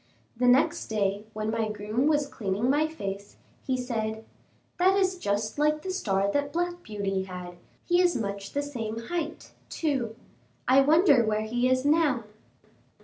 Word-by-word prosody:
The 250 +2 +1
next 255 +4 +3
day, 205 -1 -1
when 215 0 -2
my 225 -1 -1
groom 215 +6 -1
was 295 -2 +3
cleaning 230 -2 -1
my 300 +2 +2
face, 200 -10 -6 0.3
he 260 -1 +1
said: 220 -3 -3 0.5
"That 380 +2 +4
is 380 -1 +2
just 215 - -1
like 300 0 +2
the 375 - -3
star 200 - 0
that 285 +3 0
Black 350 +1 -2
Beauty 195 - -2
had, 180 -1 -8 0.3
he 350 0 +3
is 355 -1 +3
much 200 -3 -4
the 285 - 0
same 230 -6 -4
height, 315 +6 -4 0.2
too; 265 -8 -1 0.5
I 265 +2 +6
wonder 295 -3 +5
where 215 -1 0
he 240 +3 +1
is 255 +1 +1
now." 290 -5 +3
245 Hz, 160 wpm, -27 LUFS, 215-300 Hz, 0.5 s, I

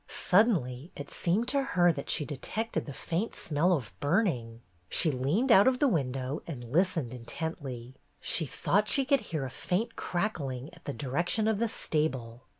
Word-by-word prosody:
Suddenly 170 - +2
it 145 - -7
seemed 200 +8 0
to 280 +1 +2
her 175 -10 +3
that 140 - -6
she 150 - +1
detected 215 - -3
the - - -5
faint 170 +10 -3
smell 160 +4 +1
of 125 - -1
burning. 145 - 0 0.3
She 160 - +3
leaned 150 - +1
out 200 0 +8
of 260 -1 +4
the 285 - +3
window 135 - -1
and 135 -7 -6
listened 165 -6 +1
intently. 130 -1 -5 0.3
She 160 - +1
thought 205 +9 +1
she 275 +3 +3
could 280 0 +4
hear 160 -9 -3
a 130 - -6
faint 210 - -2
crackling 145 -9 -2
in 175 - -16
the 140 - -3
direction 170 - 0
of 220 -2 +1
the 230 - +2
stable. 130 - -2
160 Hz, 170 wpm, -30 LUFS, 130-205 Hz, 0.3 s, out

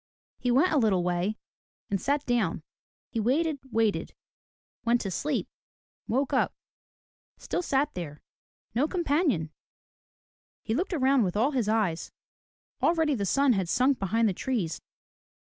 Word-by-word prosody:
He 250 - -1
went 275 +9 +4
a 305 - +3
little 200 -7 +2
way 180 +4 0 0.5
and 195 - 0
sat 285 +1 0
down. 220 -10 0 0.5
He 230 - -2
waited, 285 +7 +1
waited, 225 -3 0 0.3
— - - -82
went 235 0 +3
to 195 - -3
sleep, 290 - -1 0.6
woke 270 +4 0
up, 260 - +2 0.4
— - - - 0.3
still - - -2
sat 290 -3 +1
there, 155 -4 -7 0.2
— - - -56
no 260 +7 +2
companion! 295 - +1 1.1
He 220 - -1
looked 360 - -1
around 270 -3 +3
with 185 0 -1
all 250 +7 +3
his 245 -7 0
eyes. 205 -7 0 0.7
Already 320 -3 +3
the 200 -6 -1
sun 275 +4 +4
had 190 -5 -1
sunk 255 +5 +3
behind 220 +4 +2
the 200 - +1
trees. 195 -6 -2
240 Hz, 150 wpm, -28 LUFS, 200-280 Hz, 1.1 s, went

